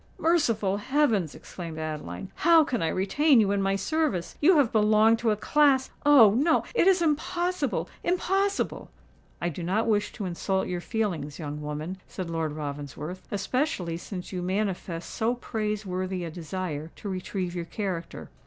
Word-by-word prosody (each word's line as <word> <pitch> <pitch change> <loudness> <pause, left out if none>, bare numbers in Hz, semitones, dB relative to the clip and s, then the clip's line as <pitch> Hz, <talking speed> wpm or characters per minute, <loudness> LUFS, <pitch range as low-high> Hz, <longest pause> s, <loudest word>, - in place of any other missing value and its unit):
"Merciful 230 - +2
heavens!" 220 - +1
exclaimed 165 -3 -8
Adeline; 150 - -5
"how 330 0 +6
can 250 -5 -2
I 165 - +1
retain 260 - +3
you 205 -2 +3
in 200 -1 +1
my 195 0 +1
service? 205 - -1
You 335 +3 +6
have 275 -6 +3
belonged 215 +1 +4
to 235 - +1
a 210 - +3
class—oh! 275 -2 +4
no—it 320 - +2
is 370 -2 +4
impossible—impossible!" 360 +4 -1 0.5
"I 175 - -1
do 170 - -6
not 190 +6 0
wish 210 -2 +1
to 210 - -5
insult 190 +2 -1
your 180 -1 -3
feelings, 175 -10 -2
young 150 -2 -5
woman," 150 +5 -5
said 180 -3 -6
Lord 160 -2 -2
Ravensworth; 150 +3 -6
"especially 200 - -1
since 180 +1 -7
you 185 -2 -3
manifest 185 -2 -2
so 235 +2 -1
praiseworthy 195 -6 -3
a 165 - -5
desire 165 -2 -5
to - - -8
retrieve 185 -1 -3
your 175 -1 -4
character. 175 -2 -5
195 Hz, 150 wpm, -27 LUFS, 170-250 Hz, 0.5 s, how